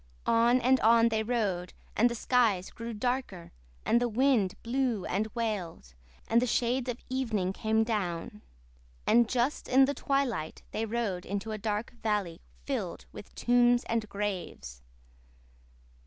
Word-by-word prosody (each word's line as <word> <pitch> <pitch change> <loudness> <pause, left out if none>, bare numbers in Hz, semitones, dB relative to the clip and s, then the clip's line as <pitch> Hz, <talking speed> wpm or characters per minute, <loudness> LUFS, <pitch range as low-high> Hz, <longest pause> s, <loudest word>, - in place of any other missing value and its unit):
On 235 +2 +4
and 260 +2 +4
on 230 +1 +5
they 220 -1 0
rode, 210 -6 -1 0.2
and 240 +3 +4
the 235 - -4
skies 220 -6 +1
grew 230 0 -6
darker 230 -5 -3 0.3
and 235 +2 +3
the 245 - +1
wind 235 -5 +2
blew 240 -4 -1
and 205 +4 -1
wailed, 195 - -3 0.3
and 230 +1 +3
the 250 - +1
shades 245 +2 0
of 245 - -3
evening 225 -8 -1
came 220 +2 +1
down. 210 -2 -3 0.6
And 235 0 +4
just 255 +3 0
in 265 +1 +6
the 285 - -1
twilight 260 - -2
they 225 +1 -2
rode 210 -6 -2
into 200 +3 -4
a 215 - -4
dark 210 +1 -2
valley, 205 -6 -1 0.2
filled 65 - -3
with - - -12
tombs 245 0 +3
and 225 -2 -2
graves. 185 - -5
225 Hz, 145 wpm, -29 LUFS, 200-245 Hz, 0.6 s, in